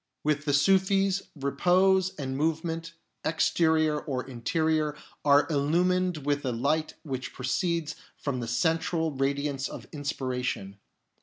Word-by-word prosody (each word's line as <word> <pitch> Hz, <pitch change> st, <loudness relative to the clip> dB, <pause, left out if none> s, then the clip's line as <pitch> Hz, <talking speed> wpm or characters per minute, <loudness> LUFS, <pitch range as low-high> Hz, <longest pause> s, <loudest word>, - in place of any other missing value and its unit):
With 150 Hz, -1 st, 0 dB
the 145 Hz, -, +1 dB
Sufis, 195 Hz, +4 st, +3 dB
repose 180 Hz, +7 st, +2 dB
and 130 Hz, -4 st, -4 dB
move 160 Hz, +3 st, 0 dB
ment, 165 Hz, 0 st, -4 dB, 0.3 s
exterior 160 Hz, -1 st, +2 dB
or 130 Hz, -5 st, -3 dB
interior, 155 Hz, +4 st, 0 dB, 0.3 s
are 145 Hz, 0 st, +5 dB
illumined 170 Hz, +2 st, +1 dB
with 145 Hz, 0 st, +1 dB
the 130 Hz, -, -2 dB
light 145 Hz, +7 st, 0 dB
which 130 Hz, -4 st, -5 dB
proceeds 160 Hz, +5 st, -1 dB, 0.2 s
from 140 Hz, -3 st, -3 dB
the 120 Hz, -, -4 dB
Central 160 Hz, +6 st, +1 dB
Radiance 140 Hz, 0 st, -1 dB
of -, -, -8 dB
Inspiration. 125 Hz, -8 st, -3 dB
150 Hz, 125 wpm, -28 LUFS, 135-165 Hz, 0.3 s, are